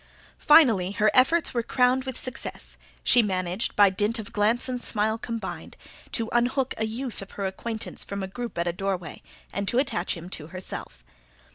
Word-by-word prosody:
Finally, 225 - +5
her 210 +1 +3
efforts 320 +6 +4
were 240 - +1
crowned 250 +2 +2
with 260 -2 -4
success: 255 -2 -5 0.3
she 245 - +6
managed, 185 0 -1
by 205 -1 +7
dint 205 +4 +1
of 220 +1 -7
glance 225 +4 +2
and 250 -1 -3
smile 220 -1 0
combined, 230 0 -6 0.3
to 230 -2 0
unhook 250 +2 +1
a 220 - 0
youth 235 +1 -4
of 195 - -10
her 200 - -3
acquaintance 220 +4 -4
from 200 -1 -5
a - - -3
group 235 +3 -6
at 170 +1 0
a 170 - 0
doorway, 180 -3 -3 0.3
and 200 +1 -2
to 240 - +1
attach 185 -11 0
him 170 +1 -8
to 155 -4 -5
herself. 165 - -6
220 Hz, 180 wpm, -26 LUFS, 190-245 Hz, 0.3 s, by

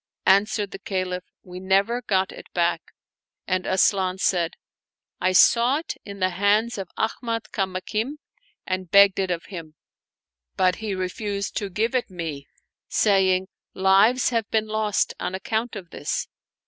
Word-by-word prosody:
Answered 200 +1 +3
the - - -7
Caliph, 185 -2 -3
" - - -68
We 180 0 -9
never 195 +6 +1
got 190 -4 0
it - - -12
back; 170 -1 +1 0.4
" - - -68
and 185 -1 -1
Asian 190 0 +2
said, 175 -3 0 0.3
'* - - -52
I 185 - +3
saw 235 +8 +5
it 325 - -5
in 200 -1 -9
the 185 0 +1
hands 205 +5 +1
of 190 -2 -5
Ahmad 230 0 -2
Kamakim 195 +6 -2 0.5
and 185 -1 -3
begged 200 0 +6
it 190 -1 0
of 170 -1 -2
him; 165 -5 -9 0.8
but 185 -1 +2
he 215 -3 -3
refused 200 +2 -3
to 200 - -2
give 220 +6 -1
it 255 -4 0
me, 160 -6 -6 0.4
saying: 190 -2 +3 0.3
Lives 200 +7 +4
have 230 -3 -1
been 220 -1 +1
lost 215 -1 0
on 185 - -3
account 220 +4 -2
of 185 -5 -9
this. 145 - -3
195 Hz, 160 wpm, -24 LUFS, 185-215 Hz, 0.8 s, begged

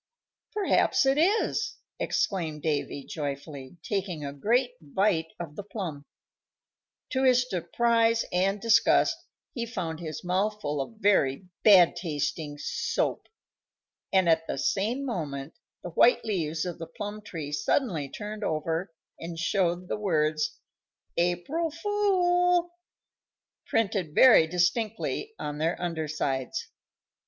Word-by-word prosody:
"Perhaps 405 -8 +3
it 270 +2 +3
is!" 435 +4 +1 0.2
exclaimed 160 -6 -1
Davy, 145 -2 -1
joyfully, 140 0 -6
taking 185 -7 -3
a 140 - -5
great 240 - +1
bite 160 +1 0
of 160 -4 -6
the - - -5
plum. 180 -8 -6 1.1
To 260 - 0
his 250 -1 +4
surprise 230 +5 +2
and 195 +3 +1
disgust 230 +1 +4 0.4
he 235 -2 -3
found 165 -8 -4
his 160 -1 -6
mouth 195 +4 0
full 145 -7 -2
of 225 - -7
very 190 -6 +2 0.2
bad 185 -6 +7
tasting 150 -3 -3
soap, - - -2 0.8
and 190 -2 +3
at 165 0 +3
the - - -3
same 230 +8 0
moment 150 - -4 0.3
the 175 - -6
white 235 +8 +4
leaves 165 -6 -1
of 175 -1 -5
the 165 - -6
plum 210 0 -6
tree 165 -8 -6
suddenly 150 - 0
turned 210 +5 -6
over 165 +2 -1 0.3
and 165 0 -6
showed 175 +1 0
the - - -2
words 155 -6 0 0.6
"APRIL 175 - 0
FOOL" 355 -1 +2 1.0
printed 195 -8 0
very 225 -11 +7
distinctly 215 - -1
on 150 0 -5
their 165 +3 0
under 165 -3 -2
sides. 135 -4 -2
180 Hz, 125 wpm, -28 LUFS, 155-225 Hz, 1.1 s, bad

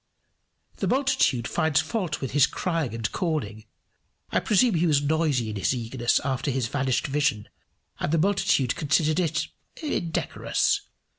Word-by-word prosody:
] - - -45
The - - -1
multitude 260 - +2
finds 160 -3 +1
fault 170 0 -2
with 135 - -3
his 140 0 +5
crying 165 -10 -2
and 110 -3 -3
calling. 115 - -3 0.6
I - - +2
presume 220 +2 +3
he 170 0 +2
was 150 -3 +4
noisy 145 -7 +1
in 105 - -5
his 100 +7 +1
eagerness 120 0 0
after 135 0 -2
his 130 -2 0
vanished 135 -2 0
vision, 140 -7 0 0.5
and - - -1
the 165 - +3
multitude 165 -8 +2
considered 155 +1 +1
it 170 -2 -1 0.3
indecorous. 310 - -1
150 Hz, 150 wpm, -25 LUFS, 125-170 Hz, 0.6 s, his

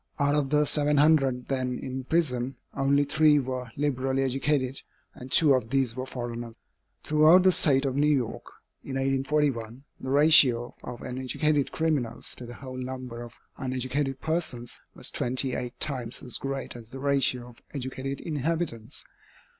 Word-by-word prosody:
Out 145 0 +2
of 145 -2 +1
the 150 +1 +3
700 145 -3 +2
then 130 -2 -1
in 130 0 -5
prison, 135 -5 0 0.2
only 140 +1 +3
three 150 +1 +4
were 130 -2 -3
liberally 135 -2 0
educated, 135 0 0 0.3
and 125 +1 -11
two 150 -4 +5
of 125 -4 0
these 130 -3 +1
were 130 0 -4
foreigners. 120 -2 -6 0.5
Throughout 155 +4 +6
the 185 - +6
State 140 -5 +2
of 135 -1 -1
New 145 +2 +3
York, 135 -6 0 0.4
in 135 - -6
1841, 135 -3 0 0.2
the 130 - -6
ratio 135 -4 +5
of 120 -1 -7
uneducated 135 +3 0
criminals 145 -8 -1
to 125 - -9
the 120 - -9
whole 130 -2 -8
number 130 -2 -6
of 120 -1 -9 0.3
uneducated 130 +1 -2
persons 155 -7 -2 0.2
was - - -1
twenty 130 +1 0
eight 125 +1 -5
times 125 -3 -3
as 125 - -1
great 135 -1 -4
as 115 -2 -10
the 130 - -8
ratio 135 -3 +1
of 120 - -18
educated 135 +1 -4
inhabitants. 155 -6 -3
135 Hz, 155 wpm, -27 LUFS, 125-145 Hz, 0.5 s, Throughout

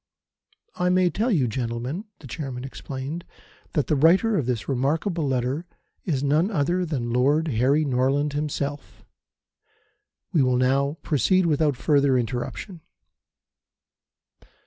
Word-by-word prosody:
"I 180 - +1
may 180 -1 +3
tell 225 +5 0
you, 150 - +2
gentlemen," 120 - -3 0.2
the - - -12
Chairman 130 -2 -5
explained, 135 +4 -6 0.5
"that 150 - +1
the 150 - +1
writer 180 +10 +4
of 145 -10 0
this 120 -4 -2
remarkable 150 +5 0
letter 130 +6 -1 0.4
is 145 -7 -1
none 150 +7 +2
other 175 0 0
than 120 -7 -2
Lord 145 +6 +2
Harry 135 +5 +2
Norland 140 +2 +1
himself. 145 -1 -4 1.3
We 155 - +4
will 125 -1 +2
now 135 +4 +1
proceed 185 +5 +2
without 150 -4 +2
further 140 -1 +3
interruption." 125 - -4
145 Hz, 125 wpm, -24 LUFS, 130-165 Hz, 1.3 s, writer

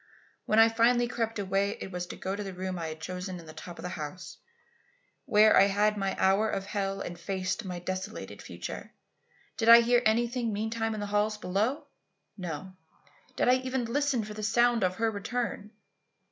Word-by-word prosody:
When 215 - +2
I 225 0 +8
finally 235 +2 +3
crept 230 -2 -2
away 195 0 0
it 190 - -7
was 180 -1 -4
to - - -7
go 190 +1 -3
to 205 - -5
the 195 -2 -7
room 185 0 -4
I 165 - -3
had 155 0 -7
chosen 180 +2 -5
in 165 - -12
the 155 - -11
top 175 +1 -9
of - - -9
the 180 - -3
house, 160 +2 -7 0.9
where 215 0 +6
I 195 - +7
had 210 +1 +2
my 195 -1 -1
hour 195 +3 +3
of 195 - -2
hell 195 -1 -2
and 175 0 -6
faced 190 +4 -3
my 180 -1 -4
desolated 185 +4 -5
future. - - -7 0.6
Did 225 0 +2
I 235 0 +11
hear 240 +1 +3
anything 235 +1 +1
meantime 220 +1 -2
in 210 - -4
the - - -2
halls 210 +1 +1
below? 210 +9 -1 0.5
No. 180 -1 -6 0.6
Did - - +1
I 250 +1 +6
even 260 -1 -2
listen 265 0 0
for 210 0 -7
the 215 - -7
sound 235 +1 +3
of 185 0 +1
her 225 +1 0
return? 210 0 -3
210 Hz, 195 wpm, -29 LUFS, 185-230 Hz, 0.9 s, I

